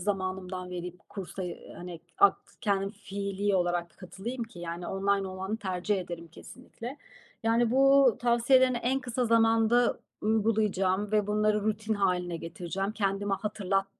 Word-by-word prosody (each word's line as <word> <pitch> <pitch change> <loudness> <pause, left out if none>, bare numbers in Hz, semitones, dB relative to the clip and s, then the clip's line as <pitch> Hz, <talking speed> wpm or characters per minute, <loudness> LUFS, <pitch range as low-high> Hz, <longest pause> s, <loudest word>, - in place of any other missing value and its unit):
zamanımdan 185 -1 -3
verip 180 0 -7
kursa, 195 -1 -6
eee, 175 -2 -7
hani, 175 -2 -8 0.2
ak 400 0 +6 0.2
kendim 195 -2 0
fiilî 200 -1 -2
olarak 175 -1 -1
katılayım 210 +7 -6
ki? 225 -6 -14
Yani 170 0 -5
online 195 0 0
olanı 190 +3 -3
tercih 190 -1 -1
ederim 170 -2 -7
kesinlikle. 250 - -10 0.5
Yani, 230 +1 +3
bu 275 -2 +5
tavsiyelerini 245 +2 +4
en 250 +3 0
kısa 250 -1 -1
zamanda 225 +1 +4 0.2
uygulayacağım 210 -2 +1
ve 210 -1 +3
bunları 210 0 +2
rutin 215 +1 -1
hâline 180 -3 0
getireceğim. 175 +4 -4
Kendime 200 -1 0
hatırlat 195 -1 -1
200 Hz, 135 wpm, -29 LUFS, 185-225 Hz, 0.5 s, ak